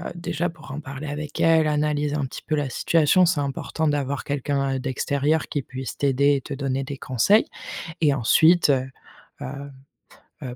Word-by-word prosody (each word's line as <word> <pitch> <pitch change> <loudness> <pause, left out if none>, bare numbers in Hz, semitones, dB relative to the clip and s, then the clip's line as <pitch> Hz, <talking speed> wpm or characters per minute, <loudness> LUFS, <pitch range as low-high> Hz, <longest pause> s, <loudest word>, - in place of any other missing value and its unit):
déjà 170 -1 -2
pour 155 -4 -12
en 140 - -5
parler 145 0 -7
avec 150 +1 -5
elle, 160 -1 +4
analyser 150 -1 0
un 145 -2 -1
petit 130 - -8
peu 155 - 0
la 145 -3 -1
situation, 165 +7 +3
c'est 175 -3 +1
important 145 +3 -2
d'avoir 140 -2 -1
quelqu'un, 140 -1 -1
heu, - - -2
d'extérieur 140 +4 0
qui 145 - -3
puisse 130 0 -7
t'aider 140 +1 +3
et 135 - -2
te 140 - -7
donner 135 -1 -2
des 140 +1 -6
conseils. 135 - +3 0.6
Et 150 -3 +4
ensuite, 160 +7 +4
heu 130 -2 +2 0.5
heu 140 +2 -6 0.7
heu, 125 -2 -6
145 Hz, 175 wpm, -24 LUFS, 135-155 Hz, 0.7 s, elle